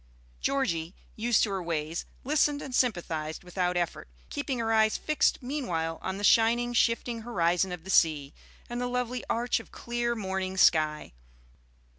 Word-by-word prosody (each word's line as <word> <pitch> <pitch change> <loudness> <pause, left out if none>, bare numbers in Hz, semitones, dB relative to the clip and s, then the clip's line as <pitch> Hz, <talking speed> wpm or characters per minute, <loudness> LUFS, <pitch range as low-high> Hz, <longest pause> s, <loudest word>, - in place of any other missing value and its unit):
Georgie, 180 -11 -1 0.2
used 230 0 +2
to 210 - 0
her 190 -1 -2
ways, 165 -1 -3 0.2
listened 290 +1 +2
and 270 -3 -7
sympathized 170 -11 -1
without 180 0 -1
effort, 175 -1 -2 0.2
keeping 285 -3 -2
her 225 -1 0
eyes 220 -1 +3
fixed 305 -3 +1
meanwhile 175 - -2
on 190 +1 -3
the 205 - -6
shining, 235 +3 +4
shifting 230 0 +1
horizon 180 -5 +1
of 175 -2 -6
the 190 - -5
sea, 150 -5 +3 0.3
and 240 +1 -4
the 245 - -1
lovely 250 0 -2
arch 240 +1 +1
of - - -13
clear 240 0 -2
morning 190 -2 -3
sky. 155 - +3
215 Hz, 155 wpm, -28 LUFS, 170-240 Hz, 0.3 s, shining